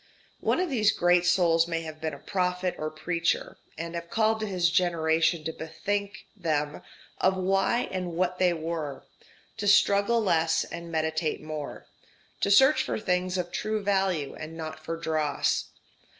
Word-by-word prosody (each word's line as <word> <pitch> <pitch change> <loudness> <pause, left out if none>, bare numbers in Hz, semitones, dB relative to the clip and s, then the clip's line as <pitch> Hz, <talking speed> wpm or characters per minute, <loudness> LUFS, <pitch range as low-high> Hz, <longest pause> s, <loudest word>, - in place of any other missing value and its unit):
One - - +1
of 365 -4 -1
these 215 -5 +3
great 175 0 +3
souls 170 -2 +4
may 165 -1 -2
have 155 -1 -8
been 160 -2 -2
a - - -10
prophet 180 +2 -1
or 155 - -2
preacher, 170 +2 -2 0.2
and 165 +1 -5
have 170 0 -5
called 220 +1 +2
to 215 - -2
his 180 -4 +1
generation 165 -2 +2
to 160 +1 -3
bethink 200 +6 -4
them 150 -6 -1 0.4
of 190 0 +2
why 195 +6 +1
and 180 -2 -3
what 180 +1 0
they 180 -1 +4
were, 160 -4 -4 0.5
to 205 - -2
struggle 200 +3 +4
less 165 -6 +2
and 170 0 -8
meditate 160 0 -1
more, 155 -2 -6 0.5
to - - +1
search 265 +9 +6
for - - -2
things 185 -2 0
of 175 -1 -3
true 215 +3 -2
value 190 -7 0
and 160 +1 -8
not 155 -1 -7
for 165 +1 -4
dross. 155 -3 0
175 Hz, 165 wpm, -27 LUFS, 160-195 Hz, 0.5 s, search